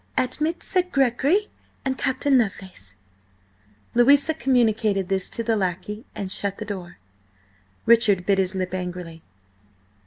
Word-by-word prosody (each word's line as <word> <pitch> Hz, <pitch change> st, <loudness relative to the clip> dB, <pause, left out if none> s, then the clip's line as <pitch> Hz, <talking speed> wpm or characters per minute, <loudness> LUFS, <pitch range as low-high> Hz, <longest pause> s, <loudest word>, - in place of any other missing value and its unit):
Admit 305 Hz, +7 st, -1 dB
Sir 370 Hz, -, +2 dB
Gregory 275 Hz, -, +2 dB, 0.4 s
and 265 Hz, -1 st, 0 dB
Captain 270 Hz, +1 st, +1 dB
Lovelace." 190 Hz, -, -2 dB, 1.0 s
Louisa 280 Hz, +6 st, +4 dB
communicated 220 Hz, -, +1 dB
this 190 Hz, -1 st, 0 dB
to 230 Hz, -, -2 dB
the 225 Hz, 0 st, +1 dB
lackey 205 Hz, +4 st, -3 dB
and 195 Hz, -2 st, -4 dB
shut 200 Hz, 0 st, 0 dB
the 215 Hz, -, -6 dB
door. 185 Hz, -4 st, -7 dB, 0.9 s
Richard 220 Hz, -6 st, +4 dB
bit 195 Hz, 0 st, +2 dB
his 190 Hz, 0 st, 0 dB
lip 185 Hz, -1 st, -3 dB
angrily. 180 Hz, -3 st, -6 dB
215 Hz, 125 wpm, -23 LUFS, 190-260 Hz, 1.0 s, Louisa